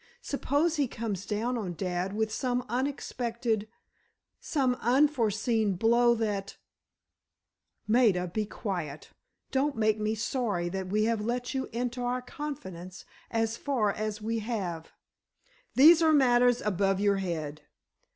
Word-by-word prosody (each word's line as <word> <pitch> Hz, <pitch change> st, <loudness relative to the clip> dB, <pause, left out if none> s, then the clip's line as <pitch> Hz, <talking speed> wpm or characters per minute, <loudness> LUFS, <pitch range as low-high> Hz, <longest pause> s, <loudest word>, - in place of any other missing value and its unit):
Suppose 290 Hz, +4 st, 0 dB
he 285 Hz, -2 st, +2 dB
comes 215 Hz, -5 st, -4 dB
down 230 Hz, +3 st, -1 dB
on 180 Hz, -5 st, -4 dB
dad 180 Hz, +1 st, -2 dB
with 220 Hz, 0 st, 0 dB
some 250 Hz, +1 st, -1 dB
unexpected, 235 Hz, -3 st, -2 dB, 0.7 s
some 265 Hz, -5 st, +1 dB
unforeseen 230 Hz, -5 st, +2 dB
blow 235 Hz, +4 st, +4 dB
that——" 205 Hz, -3 st, -3 dB, 1.3 s
"Maida, 215 Hz, -6 st, +3 dB
be 210 Hz, +4 st, -2 dB
quiet. 175 Hz, -10 st, -5 dB, 0.4 s
Don't 275 Hz, +2 st, +1 dB
make 215 Hz, -1 st, +2 dB
me 215 Hz, +1 st, 0 dB
sorry 215 Hz, -6 st, -1 dB
that 190 Hz, +1 st, -4 dB
we 210 Hz, +3 st, +1 dB
have 225 Hz, -1 st, 0 dB
let 245 Hz, +3 st, -2 dB
you 265 Hz, -1 st, -2 dB
into 245 Hz, +1 st, -3 dB
our 245 Hz, +1 st, -1 dB
confidence 190 Hz, -, -7 dB, 0.2 s
as 225 Hz, 0 st, 0 dB
far 245 Hz, -8 st, 0 dB
as 215 Hz, 0 st, -4 dB
we 225 Hz, +1 st, -1 dB
have. 195 Hz, -8 st, -4 dB, 0.8 s
These 315 Hz, +5 st, +8 dB
are 320 Hz, -1 st, +5 dB
matters 245 Hz, -3 st, +4 dB
above 195 Hz, -1 st, +1 dB
your 200 Hz, -1 st, +3 dB
head. 155 Hz, -5 st, -4 dB
225 Hz, 130 wpm, -29 LUFS, 200-250 Hz, 1.3 s, These